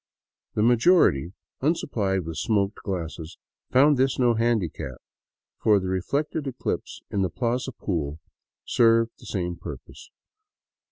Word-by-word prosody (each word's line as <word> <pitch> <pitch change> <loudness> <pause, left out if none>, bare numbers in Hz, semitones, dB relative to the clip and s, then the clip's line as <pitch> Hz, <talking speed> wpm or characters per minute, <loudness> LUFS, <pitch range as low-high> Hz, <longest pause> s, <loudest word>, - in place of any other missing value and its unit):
The 105 - +2
majority, 120 - +4 0.3
unsupplied 105 - 0
with 80 -1 -5
smoked 100 +1 0
glasses, 85 -4 -5 0.3
found 145 +2 +5
this 130 +1 +2
no 120 -2 +4
handicap, 110 - -1 0.6
for 105 -2 +4
the 95 -1 -3
reflected 140 - -1
eclipse 130 -2 -4
in 100 - 0
the 95 - +1
plaza 125 +6 -1
pool 80 - -3 0.5
served 115 -1 +4
the - - -13
same 90 -3 -2
purpose. - - -10
110 Hz, 120 wpm, -25 LUFS, 90-125 Hz, 0.6 s, found